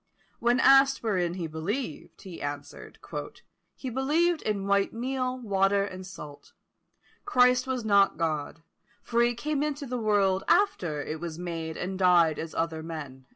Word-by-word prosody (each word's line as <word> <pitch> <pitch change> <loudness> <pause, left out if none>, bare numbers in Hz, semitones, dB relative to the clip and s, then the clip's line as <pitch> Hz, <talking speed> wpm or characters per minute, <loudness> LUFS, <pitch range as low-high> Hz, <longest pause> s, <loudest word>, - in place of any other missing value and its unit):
When 240 +2 +2
asked 270 0 +5
wherein 180 -6 0
he 175 -3 -4
believed, 160 - -5
he 185 -3 -9
answered, 145 0 -7 0.8
"He 260 - -6
believed 310 +7 +1
in 200 -2 -2
white 200 0 +1
meal, 255 +2 -2
water, 200 -3 +2
and 185 -2 -7
salt. 150 -6 -11 0.7
Christ 250 -8 +3
was 255 -3 -2
not 200 -2 +4
God; 160 -1 -2 0.4
for 235 0 +1
he 240 0 +2
came 295 +3 -2
into 295 -1 -2
the 250 -1 -3
world 200 -3 +2
after 170 - +2
it 155 +1 -5
was 165 -1 -6
made, 165 -2 -5
and 185 +1 -4
died 175 -4 +4
as 160 0 -6
other 165 -1 -1
men." 145 -5 -8
195 Hz, 155 wpm, -27 LUFS, 165-250 Hz, 0.8 s, asked